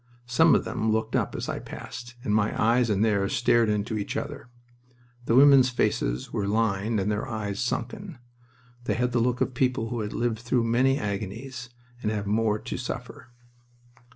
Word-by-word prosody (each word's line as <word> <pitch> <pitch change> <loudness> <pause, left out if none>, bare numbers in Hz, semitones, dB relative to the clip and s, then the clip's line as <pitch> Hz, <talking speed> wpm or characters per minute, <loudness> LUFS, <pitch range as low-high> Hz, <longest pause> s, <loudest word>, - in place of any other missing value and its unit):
Some 120 0 +4
of - - +1
them 110 0 -1
looked 110 +1 -1
up - - 0
as - - -4
I - - -3
passed, 120 +1 -9
and 105 - 0
my 105 0 +1
eyes 115 +2 +3
and 105 +1 +2
theirs 100 -3 +1
stared 120 -2 +3
into 105 +1 -1
each 100 - -3
other. 120 - -6 0.8
The 115 - +2
women's 135 -1 +7
faces 60 - -1
were 100 -2 -1
lined 110 0 0
and 100 +2 0
their 105 +3 -2
eyes 105 -4 -4
sunken. 125 - -3 0.7
They - - 0
had 125 +1 0
the 120 - +1
look 125 +1 0
of 130 - 0
people 125 -2 0
who 120 - -3
have 105 -1 -3
lived 115 -2 -1
through 120 +1 0
many 125 +4 +2
agonies 115 +5 -5 0.3
and 105 - -1
have 105 -2 -2
more 105 +1 +1
to - - -6
suffer. - - -6
115 Hz, 180 wpm, -26 LUFS, 105-125 Hz, 0.8 s, women's